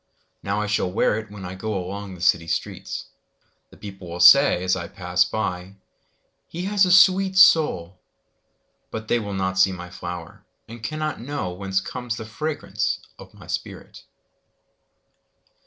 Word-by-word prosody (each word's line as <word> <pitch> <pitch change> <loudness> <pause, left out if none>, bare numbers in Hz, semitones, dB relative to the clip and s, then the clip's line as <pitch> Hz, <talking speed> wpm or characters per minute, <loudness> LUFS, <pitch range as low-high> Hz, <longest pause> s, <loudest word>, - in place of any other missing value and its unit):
Now 100 +1 -2
I 105 - -1
shall 105 -3 0
wear 105 +3 +1
itWhen 105 -3 -10
I 90 +1 -6
goAlong 100 -1 -5
the 85 - -13
city 85 -2 +2
streets:The 80 - -7
people 95 -3 -10
will 85 - -6
sayAs 90 -4 +6
I 85 -2 -5
pass 90 -1 0
by—"He 95 - -7
has 200 0 +3
a - - +1
sweet 190 +1 +5
soul!"They 110 - 0
will 100 -3 -5
not 95 0 -1
see 95 +1 +5
my 90 -1 -8
flower, 90 -2 -8 0.2
And 115 +1 -10
cannot 155 +3 -3
knowWhence 95 -8 -3
comes 125 -2 -5
the 110 - -6
fragrance 145 +8 -3 0.2
of - - -14
my - - -14
spirit! - - -6
100 Hz, 130 wpm, -23 LUFS, 90-125 Hz, 0.2 s, sayAs